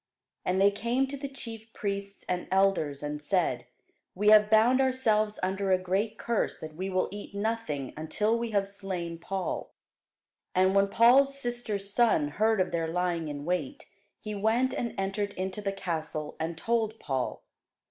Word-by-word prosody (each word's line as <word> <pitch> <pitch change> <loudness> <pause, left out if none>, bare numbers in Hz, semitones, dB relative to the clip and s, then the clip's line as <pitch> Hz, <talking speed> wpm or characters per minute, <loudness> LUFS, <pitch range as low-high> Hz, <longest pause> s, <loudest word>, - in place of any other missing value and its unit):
And 185 +1 0
they 200 +1 +6
came 235 +6 0
to 280 - -4
the 280 0 -5
chief 225 -4 -9
priests 200 -1 -4
and 180 0 -2
elders, 185 -7 +2
and 150 0 -4
said, 180 +3 0 0.5
We 210 +3 +3
have 210 0 +7
bound 230 +4 +5
ourselves 220 -5 +2
under 190 +1 0
a 185 - +5
great 190 +4 -1
curse, 235 -2 -1
that 155 -1 -8
we 185 +5 -4
will 185 -1 +1
eat 205 0 -8
nothing 200 - -2
until 210 +8 0
we 235 0 -2
have 200 -2 +1
slain 185 -4 -5
Paul. 190 0 -4 0.8
And 185 +1 +4
when 200 0 +4
Paul's 260 +6 +5
sister's 230 -6 -2
son 210 -12 +3
heard 220 +7 +2
of 185 - +1
their 165 -1 -1
lying 170 -1 -1
in 145 -1 -5
wait, 170 -6 -2 0.3
he 215 - -6
went 225 +5 +1
and 235 - -3
entered 200 +1 -2
into 190 +2 -4
the 200 -1 -1
castle, 160 -5 -4
and 160 +1 -3
told 225 +2 0
Paul. 135 -3 -3
200 Hz, 170 wpm, -29 LUFS, 180-220 Hz, 0.8 s, have